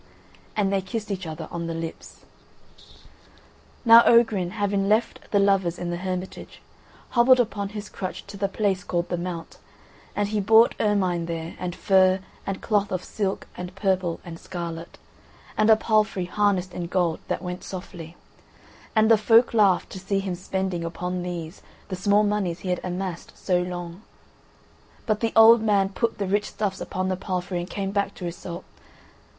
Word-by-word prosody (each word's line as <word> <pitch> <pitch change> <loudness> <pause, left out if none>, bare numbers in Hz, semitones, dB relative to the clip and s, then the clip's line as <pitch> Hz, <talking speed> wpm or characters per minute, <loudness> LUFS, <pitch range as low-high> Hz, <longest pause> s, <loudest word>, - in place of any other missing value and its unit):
And 200 -2 +1
they 195 - +2
kissed 210 +3 -5
each 190 -3 -4
other 160 +1 -6
on 170 -1 -4
the 165 - -3
lips. 165 0 -7 1.6
Now 230 0 +10
Ogrin, 215 -6 +4
having 200 -2 0
left 220 +2 0
the 205 - +2
lovers 195 -3 +2
in 175 -1 -4
the 175 - -2
Hermitage, 185 0 -5 0.5
hobbled 255 +1 +5
upon 205 -4 -1
his 210 0 -7
crutch 190 -2 -6
to 200 - -10
the 200 0 0
place 195 -2 -1
called 175 0 -2
The 175 - -1
Mount, 170 -1 -6 0.6
and 205 -1 0
he 215 0 0
bought 225 +4 +5
ermine 185 -5 +1
there 165 0 -4
and 180 -1 -4
fur 190 -1 +4 0.3
and 195 -1 -4
cloth 205 -2 +1
of 185 -1 -2
silk 200 -2 -3
and 180 0 -7
purple 185 -4 0
and 165 -1 -8
scarlet, 170 -2 -6 0.6
and 215 +1 +3
a 220 - +9
palfrey 215 -4 +1
harnessed 185 -1 0
in 175 0 -4
gold 175 -2 0
that - - -2
went 180 0 -5
softly, 175 -3 -8 0.8
and 220 +1 +4
the 220 - +6
folk 225 +3 +5
laughed 205 -5 +3
to 190 - -7
see 195 +1 -1
him 195 -2 -2
spending 185 -1 -3
upon 180 +2 -3
these 175 -1 -6 0.3
the 185 - -3
small 205 +3 +3
moneys 205 -5 -1
he 185 - -4
had 180 - 0
amassed 180 -1 -5
so 180 -2 +1
long; 175 0 -6 1.0
but 215 -2 0
the 230 -1 0
old 225 +1 +8
man 200 -3 +2
put 230 +3 -1
the 200 - -2
rich 205 +2 +1
stuffs 200 -3 -3
upon 185 0 -2
the 185 - 0
palfrey 185 -1 -3
and 175 +1 -5
came 195 -1 -3
back 200 0 -1
to 180 - -7
Iseult. 170 0 -6
190 Hz, 175 wpm, -25 LUFS, 180-205 Hz, 1.6 s, Now